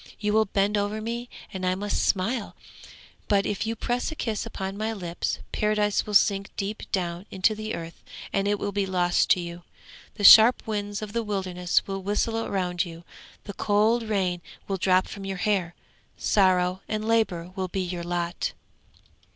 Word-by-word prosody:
You 210 0 0
will 220 0 +4
bend 200 +1 +1
over 205 +1 -2
me 235 +2 -4 0.2
and 190 -1 -5
I 185 0 +1
must 205 +2 -1
smile, 210 +4 0 0.7
but 200 -1 +2
if 210 +2 -2
you 225 - -1
press 245 +5 -2
a - - -6
kiss 225 -7 -3
upon 190 0 -5
my 215 +2 -2
lips 175 -5 -3
Paradise 210 -1 +1
will 210 - -2
sink 195 0 +3
deep 205 +2 -4
down 175 +1 -2
into 190 +3 +2
the 215 +1 -4
earth, 165 0 -8 0.3
and 195 0 +1
it 205 0 +1
will 205 0 -3
be 200 -1 -1
lost 180 -2 +2
to - - +5
you. 170 0 -6 0.5
The 205 - -6
sharp 225 +4 +9
winds 205 -1 -3
of 205 -1 -7
the 235 - 0
wilderness 185 -4 0
will 195 0 -4
whistle 225 +3 -1
round 180 -3 0
you, 170 -2 -9 0.4
the 200 - -7
cold 215 +4 +2
rain 190 -5 -1 0.3
will 195 - -1
drop 185 0 +3
from 200 - -8
your 195 -1 -4
hair. 180 -3 0 0.4
Sorrow 185 -2 +2
and 215 0 -3
labour 185 -7 +1
will 190 -1 -2
be 190 +1 -3
your 175 -1 -4
lot.' 175 0 -2
200 Hz, 180 wpm, -26 LUFS, 185-215 Hz, 0.7 s, sharp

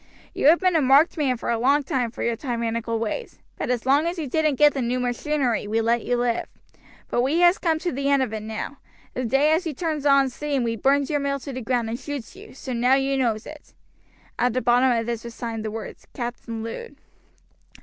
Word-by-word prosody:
You - - +2
have 330 +3 +7
been 370 -2 +2
a 320 - +4
marked 275 +5 +5
man 275 -6 0
for 235 - -3
a 230 - 0
long 280 +4 +3
time 260 -4 -1
for 225 - -6
your 235 - 0
tyrannical 230 -2 -2
ways, 230 - -4 0.2
but - - -4
as 250 -2 -1
long 285 +5 +3
as 345 +2 -3
you 320 - -3
didn't 305 +1 +1
get 295 +2 +5
the 270 - -2
new 245 +1 -1
machinery 250 -1 -1
we 220 +2 0
let 230 +1 +1
you 245 - 0
live; 240 -1 0 0.6
but 240 - +1
we 290 +7 +1
has 350 +1 +5
come 325 -3 +1
to 350 +2 -2
the 275 +1 -1
end 280 -1 +4
of 220 - -4
it 220 - -2
now; 220 +6 -5 0.4
the 255 - -3
day 270 +6 +3
as 330 +2 +1
you 305 - -4
turns 305 -2 -2
on 275 -2 +4
steam 285 -1 -2
we 230 -1 -1
burns 275 +6 +2
your 295 - +1
mill 280 0 -1
to 275 - -7
the 255 - -5
ground 240 0 0
and 230 +2 -4
shoots 285 +1 -6
you, 405 -3 -13
so 265 -1 -6
now 245 +2 +3
you 275 0 +1
knows 235 -5 0
it." 305 -1 -12 0.6
At 245 -1 +2
the 255 - 0
bottom 245 +2 +4
of 230 -1 0
this 235 -1 -3
was 235 -1 -8
signed 225 -2 -4
the 215 - -3
words 220 +1 -8
"Captain 235 -2 -5
Lud." 460 - -7
260 Hz, 240 wpm, -24 LUFS, 235-290 Hz, 0.6 s, have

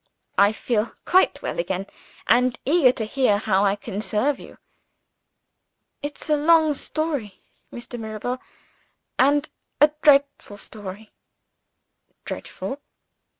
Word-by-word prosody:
"I 200 +1 +6
feel 220 0 -1
quite 375 +1 +3
well - - -3
again 185 +2 -2 0.4
and 250 +2 +3
eager 285 -2 +5
to 225 -3 -4
hear 235 -2 +2
how 205 -2 +1
I 200 0 +3
can 205 0 -6
serve 260 +7 0
you." - - -13 1.4
"It's 290 0 -6
a 305 - +3
long 310 +1 +4
story, 285 - -3 0.3
Mr. 240 0 -7
Mirabel 220 +3 -4 0.8
and 285 +3 +4 0.3
a 295 0 +6
dreadful 280 -7 +3
story." 205 0 -9 1.1
"Dreadful?" 280 +2 -6
245 Hz, 110 wpm, -23 LUFS, 210-290 Hz, 1.4 s, I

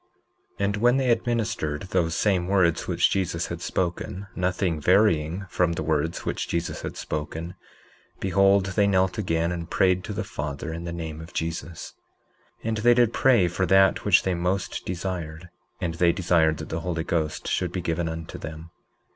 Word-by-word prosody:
19:8 100 - +2
And 100 +1 0
when 120 +4 +4
they 130 -2 +1
had 115 0 +1
ministered 110 -11 -1
those 85 -4 +1
same 95 -4 +1
words 90 -4 +2
which - - +2
Jesus 90 -3 -1
had 85 0 -5
spoken—nothing 90 -1 -2
varying 90 0 +3
from 90 -1 +1
the 80 - -3
words 80 +2 -1
which - - -2
Jesus 85 -1 -2
had - - -6
spoken—behold, 90 +5 -1
they 95 +2 +2
knelt 95 +1 +2
again 85 -3 0
and 85 -1 -5
prayed 90 -1 +2
to - - -5
the 110 - -2
Father 75 -5 -5
in 85 +1 -6
the 85 - -4
name 80 -2 -5
of 85 +2 -11
Jesus. 80 +1 -4 0.7
19:9 - - -6
And 110 - -1
they 120 +3 +5
did 120 -2 +3
pray 120 -9 +4
for 90 +2 -1
that 95 0 +4
which - - +4
they 95 - 0
most 90 +1 -2
desired; 90 -2 -4 0.3
and 85 -2 -2
they 85 +1 +3
desired 80 -4 +2
that 80 - -7
the 80 - -2
Holy 85 -1 -2
Ghost 80 -2 -2
should 90 -2 0
be 90 - -3
given 85 0 -1
unto 80 0 -6
them. 80 +2 -8
90 Hz, 180 wpm, -25 LUFS, 80-95 Hz, 0.7 s, they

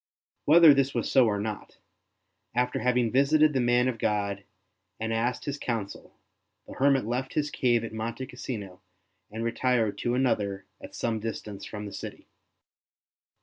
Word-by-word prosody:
Whether 160 0 +8
this 140 0 +1
was - - -1
so 130 -3 +5
or 105 -2 0
not, 105 0 -5 0.8
after 125 0 0
having 125 -2 +1
visited 150 +3 +4
the 135 - +1
man 120 0 +3
of 120 -3 -2
God 100 -2 -1 0.6
and 110 +1 -2
asked 120 +2 -1
his 145 0 -4
counsel, 110 -5 -5 0.5
the - - -10
hermit 135 -3 +2
left 125 +3 -3
his 150 -1 0
cave 120 -3 +1
at 115 - -6
Monte 115 +3 -4
Cassino 105 -8 -7 0.5
and 110 +2 -5
retired 115 -3 0
to 120 0 0
another 100 -7 0 0.2
at - - -10
some 115 -2 -1
distance 105 -2 -6
from 105 0 -7
the 100 - -8
city. 100 - -8
120 Hz, 155 wpm, -27 LUFS, 105-130 Hz, 0.8 s, Whether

